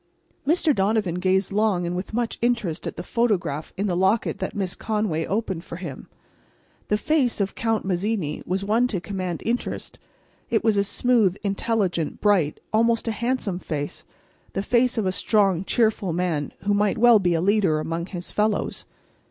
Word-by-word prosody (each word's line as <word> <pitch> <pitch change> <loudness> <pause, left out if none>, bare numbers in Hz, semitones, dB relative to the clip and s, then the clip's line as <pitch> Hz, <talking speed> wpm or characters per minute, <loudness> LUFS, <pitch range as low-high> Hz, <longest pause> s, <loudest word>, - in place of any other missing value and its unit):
Mr. 320 -1 +3
Donovan 195 -4 +1
gazed 190 +1 +1
long 200 -3 +1
and 175 +1 -2
with 180 +2 -4
much 235 +1 -2
interest 230 -9 0
at - - -5
the 175 - -4
photograph 180 -11 -1
in 200 - 0
the 185 -4 0
locket 190 +5 +1
that - - -4
Miss 190 -3 -1
Conway 210 -8 -1
opened 195 -5 -2
for 170 - -8
him. 170 -7 -7 0.8
The 210 - +2
face 265 -1 +1
of 195 -1 0
Count 225 -2 -1
Mazzini 190 -4 -1
was 190 +2 -1
one 225 +4 +3
to 205 -7 -2
command 185 -2 -4
interest. 240 +2 -3 0.5
It 225 - +1
was 220 -2 +3
a 200 - +3
smooth, 215 -2 +2
intelligent, 195 -5 -1
bright, 190 -8 +2
almost 230 +1 +2
a - - +1
handsome 220 -4 -1
face—the 155 +4 -7
face 245 +2 +2
of 220 - +1
a 185 - +2
strong, 195 -2 +2
cheerful 215 -4 +1
man 165 -4 -1
who 205 +1 +2
might 205 0 +2
well 235 -1 +7
be 175 -3 +1
a - - +1
leader 190 -5 +2
among 165 +2 -3
his 180 -2 -6
fellows. 210 0 0
200 Hz, 170 wpm, -24 LUFS, 180-225 Hz, 0.8 s, well